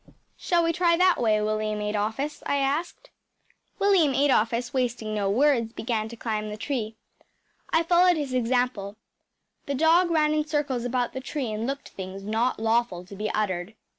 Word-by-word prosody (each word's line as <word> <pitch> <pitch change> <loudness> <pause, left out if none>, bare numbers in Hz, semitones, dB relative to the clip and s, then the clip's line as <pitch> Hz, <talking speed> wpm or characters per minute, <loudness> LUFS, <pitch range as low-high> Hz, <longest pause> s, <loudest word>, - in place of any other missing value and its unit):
“Shall 345 -1 +1
we 330 0 +1
try 340 0 +3
that 365 -4 +3
way, 215 -2 +3
William 215 0 -1
Adolphus?‚ÄĚ 215 +8 -3
I - - +2
asked. 300 - -2 0.7
William 365 -9 +3
Adolphus, 245 -3 +1
wasting 240 -4 -1
no 205 -2 0
words, 235 0 +2
began 220 -2 -2
to 235 - -8
climb 215 -2 -3
the 210 - -6
tree. 225 -2 -3 0.7
I 325 - +2
followed 350 +1 +4
his 285 -4 -3
example. 245 -5 0 0.7
The 280 - -1
dog 330 +5 +4
ran 305 -2 +2
in 305 0 0
circles 285 -5 -1
about 245 -1 -1
the 260 - -5
tree 265 -3 -4
and 215 +2 -3
looked 280 +1 -5
things 190 +1 -8
not 225 +4 0
lawful 225 -5 0
to 200 - -11
be 210 +2 -3
uttered. 195 -1 -2
245 Hz, 165 wpm, -26 LUFS, 215-295 Hz, 0.7 s, followed